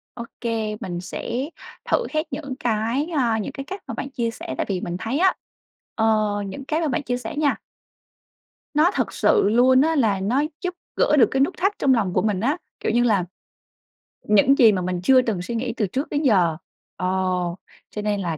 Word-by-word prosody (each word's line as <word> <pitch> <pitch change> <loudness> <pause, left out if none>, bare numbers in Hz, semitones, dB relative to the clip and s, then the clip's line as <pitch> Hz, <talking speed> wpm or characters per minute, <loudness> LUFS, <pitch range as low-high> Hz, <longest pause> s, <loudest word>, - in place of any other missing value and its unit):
Ô 235 - -6 0.2
kê, 225 -3 -2
mình 175 -1 -4
sẽ 240 - -4 0.4
thử 485 - +1
hết 310 0 +1
những 275 -4 -4
cái, 235 +3 0
a, 235 -4 +2
những 215 - -4
cái 275 0 -6
cách 380 +7 -8
mà - - -4
bạn 275 - -5
chia 235 -4 -2
sẻ 130 -11 -7
tại - - -1
vì 185 -2 -1
mình 175 0 -4
thấy 255 +7 -2
á, 375 +1 +4 0.6
ờ, 220 - +1 0.4
những 265 +8 -7
cái 310 +3 -1
mà 320 - +1
bạn 285 +2 -1
chia 245 -2 -1
sẻ 245 0 -6
nha 295 -2 +2 1.2
nó 310 +5 +4
thật - - -1
sự 200 - +3
luôn 255 +3 +5
á, 320 +2 +2
là 220 -9 +2
nó 240 +9 +1 0.2
giúp 360 -1 -2 0.2
gỡ 300 - +3
được 250 - +6
cái 265 - 0
nút 280 +7 +2
thắt 390 +3 +1
trong 270 - +4
lòng 205 -7 0
của - - +2
mình 210 -3 0
á, 275 - +1 0.2
kiểu - - -1
như 240 +2 +3
là, 205 -7 +2 1.0
những 215 +7 +4
gì 230 -4 +7
mà 190 -3 -1
mình 180 0 -2
chưa 260 +5 +6
từng 220 -7 -2
suy 235 +6 -5
nghĩ 235 0 -2
từ 210 - +1
trước 265 - -3
đến 290 - -1
giờ. 180 - +3 0.4
Ờ, 185 - -2 0.8
cho 210 - -4
nên 205 -1 -1
là 165 -4 -2
235 Hz, 215 wpm, -23 LUFS, 210-280 Hz, 1.2 s, gì